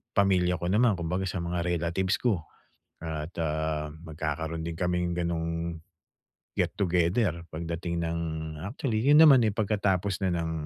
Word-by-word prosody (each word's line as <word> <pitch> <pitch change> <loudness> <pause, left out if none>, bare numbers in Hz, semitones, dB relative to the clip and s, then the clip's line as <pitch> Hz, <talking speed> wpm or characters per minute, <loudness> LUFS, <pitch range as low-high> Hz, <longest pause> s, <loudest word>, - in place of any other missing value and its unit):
pamilya 90 -3 +3
ko 85 - -1
naman, 110 +2 +4
kumbaga 90 +3 -1
sa 95 - -3
mga 85 0 -2
relatives 85 +3 0
ko. 100 -10 +1 0.6
At, 80 +1 -4
ah, 75 -1 -1
magkakaro'n 80 0 -4
din 85 -1 -4
kaming 90 -1 0
gano'ng 85 -1 -2 0.8
get - - +1
together 90 -1 +1
pagdating 85 +1 -3
ng 85 0 -1 0.5
actually 120 -2 -2
'yon 150 +2 +7
naman, 135 -5 +8
eh, - - +1
pagkatapos 100 -2 0
na - - +2
ng, 85 -1 -1
85 Hz, 140 wpm, -28 LUFS, 80-95 Hz, 0.8 s, naman